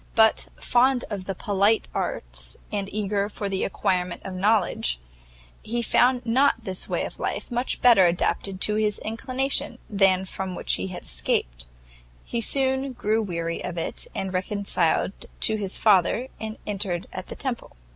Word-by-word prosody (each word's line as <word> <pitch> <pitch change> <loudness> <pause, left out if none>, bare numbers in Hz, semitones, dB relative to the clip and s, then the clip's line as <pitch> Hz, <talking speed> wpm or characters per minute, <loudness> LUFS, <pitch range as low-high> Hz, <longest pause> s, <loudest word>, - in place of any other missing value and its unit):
But, 220 -1 +4
fond 250 +1 +3
of 195 -3 -4
the 195 - -3
polite 205 +3 +2
arts, - - -4
and 200 -2 -3
eager 205 -1 -1
for 205 -1 -4
the 190 -1 -1
acquirement 180 -2 -1
of 190 - -5
knowledge, 185 - +1 0.6
he 235 +2 -2
found 245 +1 +3
not 255 +4 +4
this 190 -4 -1
way - - 0
of - - -9
life - - -3
much 245 +2 -1
better 230 -7 +7
adapted 185 +2 -1
to 210 - +3
his 210 -1 +1
inclination 255 +2 0
than 195 -2 +4
that 190 - -7
from 190 -1 -4
which - - 0
he - - 0
had 180 -1 -7
escaped; - - -1 0.6
he 235 - -2
soon 265 +1 +2
grew 220 -2 +1
weary 170 -4 -3
of 180 -1 -5
it, 165 - -3
was 190 -1 -3
reconciled 190 -1 0
to 220 - +4
his 195 -3 -3
father, 215 +5 +3
and 220 0 -5
entered 195 -4 -2
at 185 0 -6
the - - -7
Temple. 250 - -5
200 Hz, 165 wpm, -25 LUFS, 185-225 Hz, 0.6 s, better